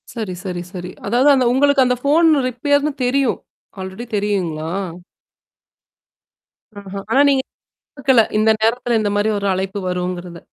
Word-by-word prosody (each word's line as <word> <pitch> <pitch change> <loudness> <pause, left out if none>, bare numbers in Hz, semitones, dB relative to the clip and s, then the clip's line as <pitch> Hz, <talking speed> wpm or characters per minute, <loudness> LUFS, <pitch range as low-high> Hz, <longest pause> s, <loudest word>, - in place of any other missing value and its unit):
சரி, 220 -6 -4
சரி, 180 -3 -4
சரி. 180 -1 -6 0.2
அதாவது 245 +7 +3
அந்த 260 -2 +2
உங்களுக்கு 285 +1 +4
அந்த 250 0 +2
ஃபோன் 320 +4 +4 0.2
ரிப்பேர்ன்னு 285 +3 0
தெரியும். 260 0 +1 0.4
ஆல்ரெடி 190 +5 -6
தெரியுங்களா? 180 -6 -2 2.1
ஆஹா! 200 0 -7
ஆனா 270 - +5
நீங்க 270 -1 +3 0.5
குடுக்கல. 265 -4 +4 0.2
இந்த 215 +1 +3
நேரத்தல 235 +1 +1
இந்தமாரி 205 0 0
ஒரு 200 0 -2
அழைப்பு 190 +2 -3
வருங்கிறது. 180 -1 -4
220 Hz, 125 wpm, -19 LUFS, 190-265 Hz, 2.1 s, ஆனா